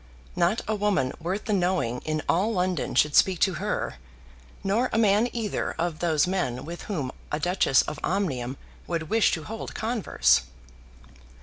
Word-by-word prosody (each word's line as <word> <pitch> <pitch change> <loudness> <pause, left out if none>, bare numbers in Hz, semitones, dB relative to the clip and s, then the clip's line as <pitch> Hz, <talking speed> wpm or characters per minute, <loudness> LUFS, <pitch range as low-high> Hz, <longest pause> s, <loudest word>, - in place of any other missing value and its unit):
Not 180 +6 +2
a 220 - +1
woman 200 -11 +1
worth 185 +5 -3
the 215 - 0
knowing 175 - 0
in 155 -1 -1
all 195 +7 +2
London 180 -5 -1
should 150 0 +3
speak 190 -2 +5
to 190 - +4
her; - - -2 0.7
nor 220 +6 +1
a - - 0
man 215 +2 +4
either 225 -4 -2
of 165 -1 -2
those 160 -3 +2
men 180 -10 -2
with 170 +2 -7
whom 145 -10 -2 0.2
a 150 - -1
Duchess 175 -5 +3
of 150 - -6
Omnium 135 -10 -1 0.3
would 165 -2 -3
wish 225 0 +4
to 160 - -2
hold 225 +7 -7
converse. 225 - +2
180 Hz, 165 wpm, -26 LUFS, 155-205 Hz, 0.7 s, speak